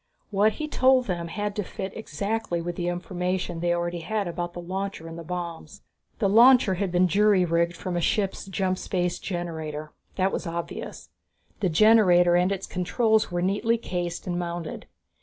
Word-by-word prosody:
What 210 +2 +3
he 305 - -4
told 260 -3 +3
them 175 -4 -3
had 205 +4 -3
to 210 - 0
fit 190 +1 -6
exactly 210 -1 -3
with 175 +1 -4
the 175 -1 -3
information 180 0 -2
they 175 +1 0
already 175 0 -1
had 205 +4 -2
about 175 0 -4
the - - -7
launcher 190 -1 -4
and 165 - -8
the 170 - -7
bombs. 170 -2 -6 0.3
The 200 - +1
launcher 230 0 +6
had 185 0 -2
been 180 +1 +3
jury 200 0 +4
rigged 170 +1 +1
from 180 -1 -4
a 175 - 0
ship's 195 +2 0
jump 190 -1 -1
space 180 -2 -1
generator; 160 -4 -5 0.2
that 190 0 +1
was - - -3
obvious. 170 0 -6 0.5
The 195 -4 +1
generator 180 -2 +5
and 180 +2 +3
its 195 -1 -2
controls 220 +4 +1
were 175 0 -1
neatly 210 +5 +1
cased 175 -5 -4
and 175 -1 -2
mounted. 170 -2 -5
180 Hz, 175 wpm, -26 LUFS, 175-200 Hz, 0.5 s, launcher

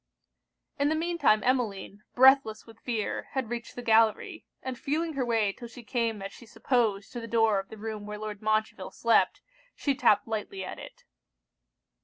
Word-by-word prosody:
In 285 +1 +3
the 315 - +1
mean 340 +2 -2
time 215 -7 +4
Emmeline, 215 -5 -1
breathless 260 -4 +5
with 225 -1 -16
fear, 225 -4 -3
had 260 -4 -2
reached 235 -1 -5
the 245 - -6
gallery, 220 -1 +2 0.2
and 260 -1 -4
feeling 315 +6 -2
her 275 -2 -1
way 225 -4 +1
'till 240 - -9
she 240 +1 -12
came 230 -3 -2
as 195 - -6
she 235 - -14
supposed 220 -4 0
to 240 - -5
the 230 - -7
door 225 -3 +3
of 195 - -8
the 220 - -10
room 215 -1 -6
where 210 0 -5
Lord 210 -1 -6
Montreville 215 -3 -1
slept, 230 0 +2 0.3
she 280 - 0
tapped 220 -6 +3
lightly 225 - -4
at - - -7
it. - - -12
230 Hz, 185 wpm, -28 LUFS, 215-255 Hz, 0.3 s, breathless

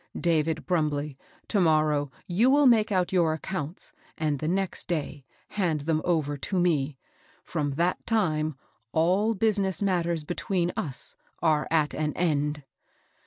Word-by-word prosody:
David 160 -2 +1
Brumbley, 150 -5 0 0.3
to 210 - +1
morrow 155 -3 +2 0.2
you 205 +8 +3
will 285 +1 +5
make 225 -4 +5
out 185 -2 +1
your 170 -4 +3
accounts, 170 - -5 0.2
and 150 -3 0
th6 155 - -2
next 190 +1 -1
day 150 -4 -3 0.3
hand 170 -7 0
them 155 +1 0
over 155 -5 0
to 185 +7 -2
me. 150 -6 +1 0.5
From 145 -4 -2
that 170 +5 0
time 155 - +1 0.4
all 190 +7 +2
business 200 -2 +1
matters 170 -4 0
between 175 +2 -1
us 135 -3 -4 0.3
are 155 -2 +2
at 155 -2 +2
an 150 0 -1
end." 150 -3 0
165 Hz, 140 wpm, -27 LUFS, 150-185 Hz, 0.5 s, will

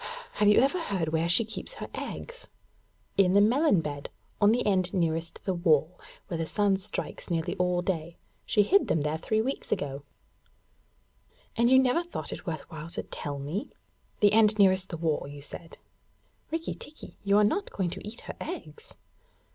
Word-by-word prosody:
Have 210 - +2
you 210 - +7
ever 275 +8 +2
heard 190 - -1
where 165 +1 0
she 220 +6 +4
keeps 220 0 -7
her - - -7
eggs?' - - -7 0.7
'In 185 -2 +5
the 200 - +6
melon 235 - +4
bed, 145 -2 -5 0.3
on 205 +1 +6
the 245 +2 +1
end 185 -3 +2
nearest 165 -1 -1
the 190 - +1
wall, 170 -1 +2 0.3
where 170 -4 -3
the 165 - 0
sun 200 0 +2
strikes 195 0 -5
nearly 165 -2 -1
all 180 -1 +1
day. 170 -2 -3 0.3
She 210 - +3
hid 395 - +4
them 155 - +1 0.2
three 220 +5 +1
weeks 270 +3 -4
ago.' 140 0 -2 1.5
'And 235 +1 +3
you 260 - +7
never 260 +5 +4
thought 345 0 -5
it - - -9
worth 160 -3 -4
while 160 0 -7
to - - -4
tell 145 -2 -5
me? 150 +10 -4 0.5
The 205 -1 +5
end 215 -1 +5
nearest 190 -2 +4
the 170 - -4
wall, 155 -3 -1
you 145 0 -9
said?' 165 +3 -6 0.7
'Rikki 325 +1 -2
tikki, 300 +2 -11
you 200 0 +4
are 210 - +6
not 390 - +1
going 180 -3 -2
to - - -6
eat 225 +3 -7
her - - -8
eggs?' 455 +2 -8
190 Hz, 180 wpm, -28 LUFS, 165-220 Hz, 1.5 s, you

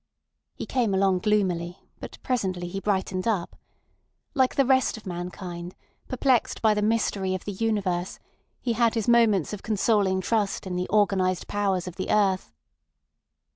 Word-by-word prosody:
He - - -5
came 235 -7 0
along 190 -1 +2
gloomily, 180 -4 0 0.2
but - - -9
presently 190 -8 -1
he 195 +3 -4
brightened 190 -1 -1
up. 200 -6 -1 0.8
Like 260 -2 +2
the 275 - +3
rest 260 -2 +2
of 220 - -13
mankind, 175 0 -6 0.3
perplexed 255 -1 +1
by 220 -2 +4
the 210 - -1
mystery 205 -3 0
of 185 - -7
the 205 - -3
universe, 195 -4 -1 0.4
he 240 - -1
had 235 0 +2
his 225 -3 -1
moments 225 -7 +3
of 205 - -6
consoling 205 -3 +1
trust 205 +1 -1
in 185 -1 -4
the 180 0 -2
organised 195 -3 +1
powers 195 -3 -1
of 180 - -8
the 190 - -4
earth. 195 - +2
200 Hz, 155 wpm, -26 LUFS, 185-220 Hz, 0.8 s, by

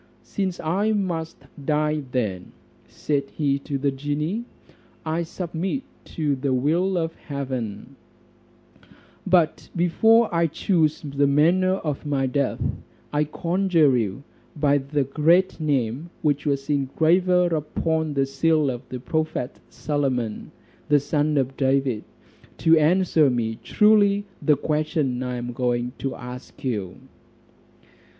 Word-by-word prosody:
"Since 190 -3 -3
I 200 +7 0
must 175 -6 -3 0.2
die 150 +1 +1
then," 105 -8 -2 0.3
said 140 -2 -2
he 140 -2 0
to 140 0 -4
the 140 +1 0
genie, 150 - -2 0.6
"I 160 +2 -1
submit 175 +8 -3 0.2
to 150 -3 -1
the 135 0 -1
will 170 +8 +1
of 165 -1 -1
heaven; 130 -4 -5 1.3
but 175 -4 +2
before 225 +7 +4
I 170 0 +3
choose 160 -1 0
the 140 -1 +1
manner 175 +6 +3
of 150 -7 -4
my 140 -3 0
death, 135 +1 -1 0.5
I 150 +1 +2
conjure 170 -3 +2
you 110 +1 -2 0.3
by 145 -1 +3
the 140 +1 -1
great 160 +7 +2
name 140 0 -1
which 150 0 +1
was 140 -1 -1
engraver 170 +5 +2
upon 160 0 -1
the 135 -1 +2
seal 150 +1 +2
of 120 -1 -6
the 130 - -5
prophet 155 -1 -2
Solomon, 130 -6 -2 0.4
the 145 0 +5
son 145 +1 0
of 135 0 0
David, 135 -4 +1 0.5
to 165 0 +5
answer 160 -1 +4
me 115 -3 -2
truly 205 -1 +4 0.2
the 150 -3 +3
question 150 -4 -1
I 125 -1 -3
am 120 0 -5
going 120 0 -1
to 135 -1 -3
ask 125 +1 -10
you." 105 -9 -2
150 Hz, 125 wpm, -24 LUFS, 135-165 Hz, 1.3 s, the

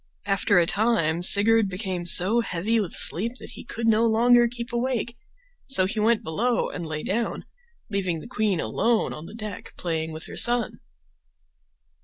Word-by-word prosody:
After 200 0 +1
a 175 - +4
time 175 -5 0
Sigurd 210 +4 +4
became 185 -2 -4
so 190 +7 +4
heavy 220 +2 -1
with 195 -6 -3
sleep 225 +8 +1
that - - -9
he - - -10
could 230 -1 -4
no 225 +1 +3
longer 240 +2 +4
keep 235 +1 -8
awake, 240 -1 -2 0.5
so 225 -9 +4
he 215 +4 -3
went 220 +1 +2
below 230 +10 -1
and 170 -2 -6
lay 155 -1 -5
down, 230 +3 -3 0.4
leaving 185 -5 -2
the - - -11
queen 215 -7 -1
alone 230 +6 0
on 155 +2 -9
the 215 - -11
deck 215 -4 -8
playing 160 -2 -3
with 160 +1 -7
her - - -10
son. 240 -1 +2
215 Hz, 170 wpm, -24 LUFS, 180-235 Hz, 0.5 s, a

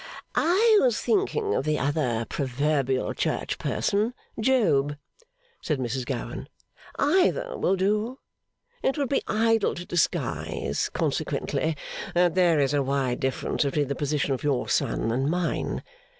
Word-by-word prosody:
'I 415 +6 +4
was 245 -4 +2
thinking 415 +1 +1
of - - 0
the 155 +1 0
other 135 -6 0
proverbial 135 -1 0
church - - -2
person 215 +5 0 0.2
Job,' 205 - +2 0.7
said 150 - -1
Mrs 125 0 -3
Gowan. - - -4 0.5
'Either 370 - +2
will 190 - +1
do. 210 +6 0 0.6
It 270 - 0
would 280 -3 0
be 280 - +1
idle 225 -1 +2
to 175 - -6
disguise, 175 -3 -1
consequently, 160 -1 -1 0.4
that 175 -1 +4
there 175 -4 +4
is 140 0 +2
a 145 - +2
wide 135 -2 0
difference 130 +3 -1
between 140 0 0
the - - +1
position 145 -1 0
of 130 - -3
your 140 -4 0
son 115 - 0
and 135 +4 0
mine. 175 +1 -1
155 Hz, 135 wpm, -26 LUFS, 135-225 Hz, 0.7 s, I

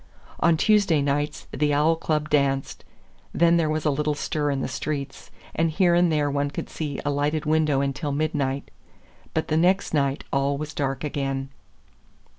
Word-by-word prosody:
On 165 -1 +4
Tuesday 200 -5 +3
nights 145 +1 -1
the 150 -1 +1
Owl 155 +3 +3
Club 155 -2 -2
danced; 135 -2 0 0.5
then 170 0 +4
there 160 -2 +1
was 155 0 -2
a 150 - +3
little 150 +1 0
stir 145 0 -1
in 140 -1 -1
the - - -2
streets, 140 +1 -5 0.2
and 165 0 +1
here 175 +2 +3
and 175 -1 +4
there 150 -2 +1
one 145 0 0
could 140 - -6
see 150 -3 -4
a 145 - +1
lighted 150 +2 -1
window 155 -3 +2
until 140 +2 -2
midnight. 140 -2 -1 0.6
But 160 - -1
the 155 - +2
next 185 +3 +2
night 140 -2 0
all 140 +1 +1
was 155 +2 -5
dark 135 -1 -2
again. 135 -2 -2
150 Hz, 175 wpm, -24 LUFS, 140-155 Hz, 0.6 s, On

